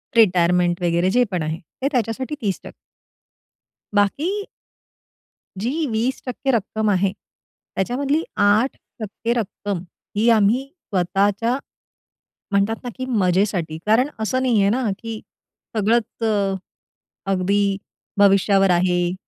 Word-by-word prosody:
Retirement 180 -4 +4
वगैरे 175 +1 +2
जे 250 +2 +4
पण 180 - -1
आहे 155 +1 -3 0.2
ते 275 - +2
त्याच्यासाठी 250 +3 -1
30% 200 -4 -3 1.2
बाकी 320 - +1 1.1
जी 265 +11 -1
20% 250 +3 -1
रक्कम 220 -2 0
आहे 195 -1 +2
त्याच्यामधली 275 - -3
8% 215 +1 0
रक्कम 205 -4 -3 0.4
ही 220 +3 +3
आम्ही 225 +4 +4 0.2
स्वतःच्या, 200 +6 +1 0.9
म्हणता 200 +2 +2
ना, 245 - -4
की 260 - -3
मजेसाठी 185 -7 +1
कारण 230 +6 +3
असं 255 +4 0
नाहीये 220 -6 +3
ना, 240 +1 +1
की 225 -1 -6 0.6
सगळंच 225 +2 +1
अ, 200 -3 +1 0.8
अगदी 195 +1 +2 0.4
भविष्यावर 195 -1 +5
आहे. 175 0 +2
205 Hz, 105 wpm, -22 LUFS, 190-240 Hz, 1.2 s, भविष्यावर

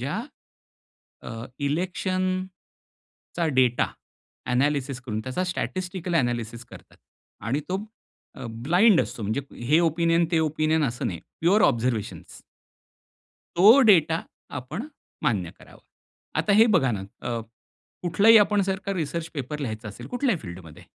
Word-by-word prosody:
ज्या - - -3 1.1
अ, - - -7 0.4
इलेक्शनचा 185 +1 -4
data 125 -2 +3 0.7
analysis 140 0 0
करून 110 -3 -3
त्याचा 130 +10 -2
स्टॅटिस्टिकल 180 -1 -3
ॲनालिसिस 120 -4 -1
करतात - - -15 0.5
आणि 135 +6 0
तो 185 - 0 0.6
अ, 135 -4 -8 0.2
ब्लाइंड 180 +4 +5
असतो, - - -6
म्हणजे 110 +7 -1 0.3
हे 155 - +6
ओपिनियन, 170 0 +2
ते 165 - +3
ओपिनियन 155 0 +1
असं 120 0 -3
नाही, 85 -4 -4 0.2
प्युअर 190 +6 +4
ऑब्झर्व्हेशन्स. 115 -2 -1 1.2
तो 215 +10 +8
डेटा 165 - +5 0.4
आपण 150 - -5 0.4
मान्य 105 - 0
करावा. - - -16 0.6
आता 210 - +2
हे 220 +3 +7
बघा 135 -7 +3
ना, 100 - -3 0.3
अ, 120 -1 -2 0.6
कुठलाही 200 +6 +5
आपण 205 -1 +3
जर 190 0 -1
का 200 - 0
रिसर्च 165 -1 -3
पेपर 150 +1 -4
लिहायचं 110 -6 -5
असेल, 100 - -9
कुठल्याही 245 - 0
फील्डमध्ये, 85 -4 -10
160 Hz, 125 wpm, -25 LUFS, 125-185 Hz, 1.2 s, तो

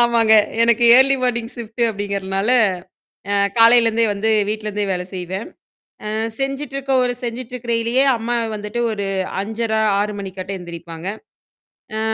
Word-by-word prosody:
ஆமாங்க, 230 -2 +4 0.3
எனக்கு 235 0 +3
early 270 +1 +5
morning 235 -2 -1
shift 235 0 -5
அப்படிங்கிறனால, 200 0 -2 0.8
அ - - +2 0.2
காலையிலேருந்தே 230 0 +5
வந்து 215 +2 -1 0.2
வீட்லேருந்தே 210 -1 -2
வேலை 180 0 -2
செய்வேன். 185 +3 -5 0.6
அ - - -2 0.3
செஞ்சுட்ருக்க 275 0 -3
ஒரு 245 - 0
செஞ்சுட்ருக்கயிலேயே 240 0 -1
அம்மா 235 +2 -2 0.2
வந்துட்டு 210 +3 -4
ஒரு 200 -2 -3 0.4
5:30, 220 +1 -1 0.2
6 210 +1 -1
மணிக்காட்டம் 190 0 -6
எந்திரிப்பாங்க. 170 0 -8 0.9
அ - - -1
225 Hz, 120 wpm, -20 LUFS, 200-240 Hz, 0.9 s, early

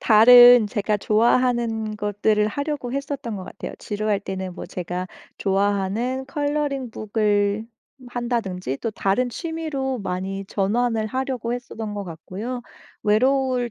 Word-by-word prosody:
다른 245 +1 +8
제가 210 0 0
좋아하는 225 0 +1
것들을 210 +1 +1
하려고 285 -1 -3
했었던 275 -5 -4
것 185 - -7
같아요. - - -7
지루할 210 -1 -1
때는 190 -2 -5
뭐 - - -6
제가 180 0 -4 0.3
좋아하는 205 +6 0
컬러링 285 -3 -2
북을 210 -1 0 0.4
한다든지 230 - -2
또 230 - -2
다른 205 +5 0
취미로 300 -4 -3
많이 195 0 -4
전환을 220 +3 0
하려고 255 -1 -2
했었던 225 -3 -5
것 205 - -3
같고요. 200 +9 -6 0.4
외로울 255 +3 +2
220 Hz, 290 characters per minute, -23 LUFS, 200-250 Hz, 0.4 s, 다른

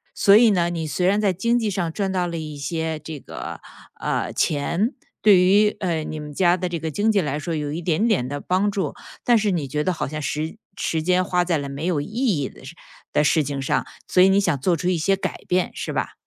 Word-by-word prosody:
所 200 - +6
以 225 +1 +7
呢， 175 -3 +2
你 165 -2 -3
虽 180 +4 0
然 200 +2 +3
在 200 -3 +3
经 235 +7 +1
济 220 -3 0
上 175 -4 -1
赚 195 -2 -1
到 180 -2 0
了 170 -1 -4
一 155 -2 -6
些， 160 +2 -3
这 155 0 -7
个， - - -8 0.4
呃， - - -1
钱， 170 - 0 0.3
对 205 -4 +7
于， 205 +3 +4
呃， 170 -5 -1
你 155 0 -5
们 150 0 -7
家 175 +1 +4
的 180 0 -3
这 175 - -2
个 160 0 -4
经 210 +7 +2
济 205 - +3
来 150 -4 -1
说 165 +2 -3
有 150 -1 -3
一 170 - -4
点 175 +6 +1
点 195 - +1
的 145 +2 -4
帮 185 +6 +1
助， 200 -1 -2 0.3
但 240 - +4
是 210 -1 +1
你 160 -7 -1
觉 150 +3 -1
得 185 - +1
好 175 - -3
像 155 +2 -5
时 155 +5 -3 0.2
时 160 - -1
间 180 +2 +2
花 180 -2 +1
在 170 -2 +1
了 140 -1 -4
没 140 +2 -6
有 170 -4 +1
意 145 - -3
义 215 - +1
的 - - -15
事 140 +6 -10 0.4
的 - - +2
事 155 +1 +3
情 140 0 -4
上， 135 - -1 0.2
所 180 - +3
以 190 - +7
你 195 +1 +4
想 175 -8 +1
做 170 +5 +1
出 175 - -3
一 180 -3 +1
些 195 +5 +2
改 195 - -4
变， 180 0 +1
是 - - -4
吧？ - - -2
175 Hz, 275 characters per minute, -23 LUFS, 155-195 Hz, 0.4 s, 以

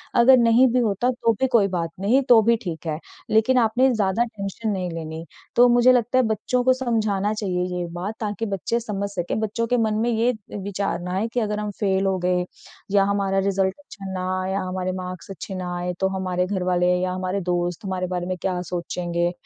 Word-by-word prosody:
अगर 255 +2 +7
नहीं 235 +2 +5
भी 255 - +3
होता 235 +1 +1
तो 230 -2 +1
भी 265 - +4
कोई 210 -4 +4
बात 165 -1 -2
नहीं, 235 +8 +3
तो 235 -2 +8
भी 235 - +6
ठीक 170 -3 -6
है, 155 0 -2 0.3
लेकिन 225 +4 +3
आपने 240 +4 +3
ज़्यादा 210 +1 +1
टेंशन 215 0 -5
नहीं 185 -3 -2
लेनी। 160 0 -6 0.3
तो 245 +1 +7
मुझे 245 +1 +6
लगता 245 0 +2
है 255 - +5
बच्चों 220 +3 0
को 255 +1 +5
समझाना 215 -5 0
चाहिए 185 -4 -1 0.2
ये 175 - -2
बात, 185 +5 -4
ताकि 215 +1 -3
बच्चे 215 +5 -1
समझ 200 -3 -3
सकें 185 +1 -3
बच्चों 220 +2 -1
के 245 - +2
मन 220 -2 +1
में 240 - +1
ये 235 +2 +2 0.3
विचार 200 -2 -2
ना 180 +1 -4
आए 205 +4 0
कि 245 - +1
अगर 210 -2 -1
हम 210 -1 -3
फ़ेल 195 -2 +1
हो 190 -1 +1
गए 180 0 +1 0.5
या 200 -1 +4
हमारा 200 -1 +1
रिज़ल्ट 190 -1 +1
अच्छा 200 -9 -9
ना 185 0 -3
आया 190 +1 -1
हमारे 185 0 -2
मार्क्स 180 0 -7
अच्छे 195 0 -7
ना 180 -1 -4
आए 180 0 -2
तो 190 - +2
हमारे 180 -1 -1
घरवाले 180 -2 +1
या 185 0 -1
हमारे 185 +1 -2
दोस्त 175 0 -2
हमारे 185 -1 -2
बारे 180 -1 -3
में 185 0 -3
क्या 180 -2 -1
सोचेंगे? 175 0 -2
195 Hz, 215 wpm, -23 LUFS, 180-225 Hz, 0.5 s, तो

